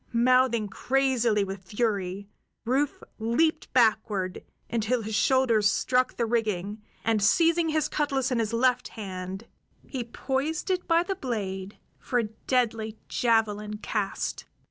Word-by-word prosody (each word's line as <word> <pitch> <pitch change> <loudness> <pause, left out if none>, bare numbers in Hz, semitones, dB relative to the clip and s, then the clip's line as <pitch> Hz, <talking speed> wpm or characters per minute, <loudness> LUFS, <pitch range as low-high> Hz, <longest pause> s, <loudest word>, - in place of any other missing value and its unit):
Mouthing 240 -2 +3
crazily 245 -1 +1
with 195 -1 -5
fury, 200 -2 -2 0.4
Rufe 270 +4 0 0.2
leaped 310 +8 +1
backward 215 -6 +1 0.2
until 230 +1 0
his 220 +1 -5
shoulders 225 -2 +3
struck 255 0 +1
the 235 - +1
rigging, 215 -3 -1 0.2
and, 225 -2 +2
seizing 330 - +4
his 310 -1 +1
cutlas 275 -4 0
in 245 - +1
his 220 -1 0
left 250 +1 +2
hand, 190 -1 -6 0.4
he 260 -3 -4
poised 275 - -2
it 365 -1 -1
by 335 0 +4
the 390 - -2
blade 200 - -4 0.2
for 250 - -2
a 240 - +3 0.2
deadly 225 -4 0
javelin 210 -3 +1
cast. 210 -2 -3
230 Hz, 130 wpm, -27 LUFS, 210-260 Hz, 0.4 s, seizing